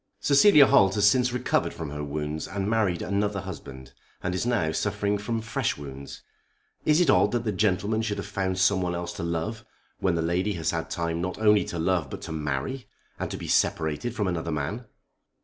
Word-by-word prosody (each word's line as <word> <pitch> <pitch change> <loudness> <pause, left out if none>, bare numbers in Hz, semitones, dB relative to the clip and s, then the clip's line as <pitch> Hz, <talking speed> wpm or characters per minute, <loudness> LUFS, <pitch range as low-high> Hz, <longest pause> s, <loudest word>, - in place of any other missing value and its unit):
"Cecilia 145 +1 +6
Holt 95 -9 +4
has 105 -1 +4
since 125 +3 +3
recovered 125 0 0
from 80 -3 -6
her 75 0 -5
wounds 75 +1 -4
and 95 0 -3
married 105 -6 +1
another 100 0 -1
husband, 70 -8 -9 0.3
and 90 - -1
is 90 +6 -1
now 105 -11 +1
suffering 100 +5 -1
from 115 +2 -2
fresh 115 - -2
wounds. 70 -1 -9 0.6
Is 155 +1 +4
it 170 -6 +4
odd - - +3
that 120 -1 0
the 110 - -1
gentleman 105 +2 +1
should 110 -2 -2
have - - -4
found 95 -1 -2
some 95 0 +3
one 90 -1 -1
else 85 0 -4
to 85 - -6
love 85 +7 -3 0.4
when 95 -3 +1
the 80 - 0
lady 90 +5 0
has 80 -3 -1
had 80 -1 -3
time 85 0 -2
not 90 +1 -3
only 105 -3 +4
to 85 - -5
love 85 -3 0
but - - -7
to - - -6
marry, 75 - -3 0.3
and - - -3
to - - -5
be - - -7
separated 80 +10 0
from 105 -4 0
another 85 -2 -2
man?" 75 - -3
95 Hz, 205 wpm, -26 LUFS, 80-110 Hz, 0.6 s, Cecilia